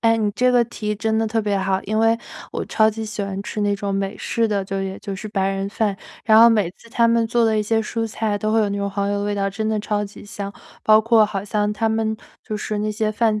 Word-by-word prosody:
哎， 225 0 +4
你 210 -2 +1
这 250 +4 +2
个 245 -1 +5
提 220 -2 -5
议 - - 0
真 220 +1 -1
的 225 - +1
特 225 +1 0
别 205 -2 0
好。 190 0 0
因 215 +2 -1
为 225 +1 +4 0.4
我 - - -2
超 220 0 +3
级 220 +1 -5
喜 210 -1 -4
欢 195 0 -4
吃 210 +1 -4
那 205 0 +2
种 200 -1 -3
美 195 +1 -2
式 230 -1 0
的， 205 -2 0
就 195 0 -3
也 190 0 -4
就 195 -1 -6
是 215 - -7
白 195 -2 0
人 195 0 -2
饭， 205 -1 -1 0.3
然 220 -1 +6
后 230 +1 +9
每 210 -6 +2
次 230 +4 -19
他 235 -1 +3
们 230 0 +3
做 235 +1 +1
的 220 -1 +2
一 - - +1
些 225 +1 +1
蔬 225 +1 -2
菜 215 -1 -2
都 215 +1 -1
会 225 - +4
有 210 - +2
那 200 - -2
种 200 0 -1
黄 200 0 -1
油 205 - 0
的 - - -2
味 205 0 -1
道， 200 -1 0
真 205 +3 -3
的 215 -1 0
超 210 -1 -1
级 200 - -11
香。 200 -1 -6 0.3
包 215 0 +6
括 225 0 +5
好 200 -2 -3
像 210 0 0
他 225 +1 0
们 220 0 0 0.3
就 215 - -5
是 210 0 -3
那 215 0 -1
些 215 0 0
饭 215 -1 +1
215 Hz, 310 characters per minute, -21 LUFS, 200-225 Hz, 0.4 s, 后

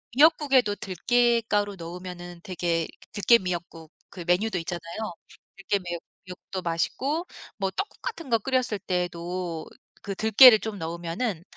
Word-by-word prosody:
미역국에도 275 -7 +4
들깻가루 220 +1 +1
넣으면은 175 +1 -8
되게 170 -3 -1 0.3
들깨 210 +3 +5
미역국 170 -3 -5 0.2
그 180 - -8
메뉴도 185 +4 +1
있잖아요. 170 +4 -5 0.4
들깨 195 +1 0 0.5
미역국도 185 +1 -7
맛있고 265 - -1 0.3
뭐 195 -2 0
떡국 390 - -5
같은 335 - -6
거 230 - +4
끓였을 250 -2 0
때에도 175 -2 -3 0.4
그 195 -2 -4
들깨를 220 +2 +8
좀 220 -2 -5
넣으면은 170 +3 -3
190 Hz, 300 characters per minute, -26 LUFS, 175-230 Hz, 0.5 s, 들깨를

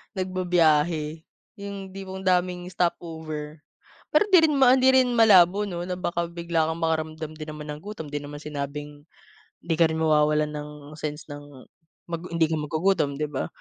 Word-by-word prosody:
nagbibiyahe, 165 -4 +1 0.4
yung 200 -1 -6
hindi 195 +1 -8
mo 190 0 -6
ang 190 - -10
daming 180 0 +1
stop 175 -1 +1
over. 155 -2 -7 0.5
Pero 305 - +5
hindi 370 - +8
rin 300 - 0
hindi 260 0 +5
rin 260 -1 +5
malabo 200 -3 +6
'no 175 -4 -5
na 180 0 -3
baka 170 -1 -2
bigla 170 -1 -1
kang 165 +1 -5
makaramdam 160 -1 -2
din 155 0 -8
naman 150 -1 -8
ng 150 - -9
gutom, 205 -5 -7
'di 145 - -2
naman 145 0 -8
sinabing 145 0 -6 0.6
hindi 165 -1 -1
ka 165 -1 +5
rin 160 - -2
mawawalan 150 -1 +3
ng 150 0 -6 0.3
sense 150 0 -5
ng 145 0 -7 0.7
mag 170 0 -4
hindi 165 -1 +2
ka 160 - 0
magugutom 155 -1 0
'di 150 - -1
ba. 135 - -3
165 Hz, 175 wpm, -25 LUFS, 150-185 Hz, 0.7 s, hindi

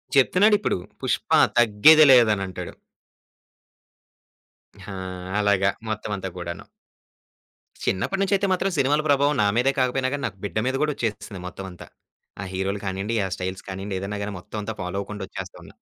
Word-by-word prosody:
చెప్తున్నాడిప్పుడు 200 - +4 0.2
'పుష్ప' - - +2 0.2
తగ్గేదే 120 +8 +7
లేదనంటాడు. 95 -7 +2 2.2
ఆ! - - -6 0.5
అలాగా. 100 -2 +3 0.2
మొత్తమంతా 105 -3 -3
కూడాను. 85 -1 -6 1.2
చిన్నప్పటి 190 - -1
నుంచయితే 195 0 +2
మాత్రం 190 +1 0
సినిమాల 145 +2 +2
ప్రభావం 145 +1 +3
నా - - +3
మీదే 130 +3 +3
కాకపోయినా 130 +1 +1
గాని, 145 - -3
నాకు - - -10
బిడ్డ 100 - -4
మీద 130 - 0
కూడా 150 0 +2
వచ్చేసింది 105 -4 -4
మొత్తం 95 +1 -8
అంతా. 90 - -12 0.5
ఆ - - -4
హీరోలు 95 +2 -2
కానియండి, 95 +4 -2
ఆ - - -2
స్టైల్స్ 95 +1 -5
కానియండి, 95 0 -4
ఏదైనా 100 +2 -4
గాని, 105 0 -4
మొత్తం 95 - -9
అంతా 110 +1 -5
ఫాలో 90 +2 -4
అవ్వకుండా 105 0 -6
వచ్చేస్తున్నా. - - -9
105 Hz, 140 wpm, -24 LUFS, 95-135 Hz, 2.2 s, తగ్గేదే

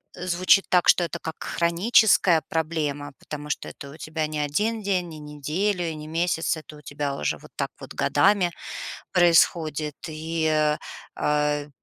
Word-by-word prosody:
звучит 185 +2 +3
так, 180 -1 +4
что 175 - +6
это 170 0 -3
как 160 -1 -6
хроническая 175 -1 +3
проблема, 150 -3 -2
потому 150 0 -7
что - - -3
это 140 - -9
у 145 - -12
тебя 155 -1 -3
не 155 0 -5
1 210 +10 -1
день, 185 -3 0
не 155 - -9
неделю 160 +6 -2
и 160 - -5
не 150 0 -8
месяц, 165 0 0
это 155 -1 -11
у - - -14
тебя 145 -1 -3
уже - - -1
вот - - -15
так - - -2
вот - - -9
годами 195 -3 +3 0.6
происходит. 160 -4 +3
И, 160 +1 -2 0.7
э, 150 0 0
160 Hz, 155 wpm, -25 LUFS, 150-175 Hz, 0.7 s, что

